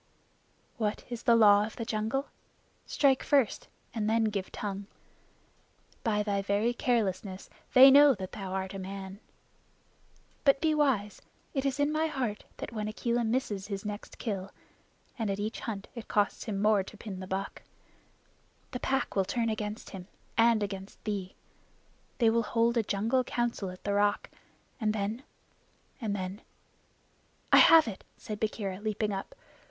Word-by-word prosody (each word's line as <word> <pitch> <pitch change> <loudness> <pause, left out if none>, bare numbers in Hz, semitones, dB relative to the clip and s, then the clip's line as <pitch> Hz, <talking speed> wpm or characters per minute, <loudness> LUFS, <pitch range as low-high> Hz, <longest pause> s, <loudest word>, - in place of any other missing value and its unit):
"What 215 -3 -1
is 240 -1 -4
the 235 -4 +4
Law 205 -2 +7
of 215 - -6
the 230 - -4
Jungle? 225 +6 -2 0.6
Strike 270 -3 +3
first 275 -8 +1 0.3
and 215 -2 -1
then 225 0 +3
give 205 -3 -2
tongue. 200 -1 -5 1.2
By 210 -3 +1
thy 200 -1 0
very 205 +4 +1
carelessness 200 -6 -1 0.2
they 265 +1 +10
know 285 0 +8
that 190 -2 -7
thou 195 -2 -6
art 190 0 -3
a 195 - -5
man. 190 +1 -7 1.2
But 275 -1 +5
be 315 +1 +2
wise. 260 -9 +1 0.3
It 270 -2 -1
is 275 +1 -2
in 290 +1 +2
my 310 +1 +1
heart 255 -9 -3
that - - -6
when 215 -2 -3
Akela 235 +2 -1
misses 220 -4 -1
his 200 0 -5
next 210 0 -6
kill 195 -4 -3 0.7
and 220 -2 -1
at 195 - -1
each 215 +3 -3
hunt 205 -4 -5
it 235 -3 -8
costs 205 -1 0
him 205 -3 -3
more 210 -1 +4
to 195 +3 -10
pin 195 -3 -7
the 185 - -7
buck 190 +1 -4 1.1
the 250 - -4
Pack 270 +1 -1
will 195 - +3
turn 230 +4 -1
against 215 0 -4
him 185 -2 -8 0.3
and 230 -2 +4
against 195 -1 -7
thee. 200 -3 -4 0.8
They 230 -3 +4
will 230 +1 +2
hold 230 +1 +1
a 235 - +4
jungle 225 +5 +1
Council 240 -5 -2
at 180 0 -11
the 200 - -1
Rock, 205 0 +1 0.5
and 215 -2 +1
then 215 +3 -2 0.8
and 210 -3 -1
then 190 +2 -5 1.1
I - - +10
have 325 -4 +8
it!" 200 -4 -6
said 210 -1 -6
Bagheera, 200 -3 -2
leaping 215 -1 -1
up. 195 - -6
215 Hz, 160 wpm, -30 LUFS, 200-235 Hz, 1.2 s, they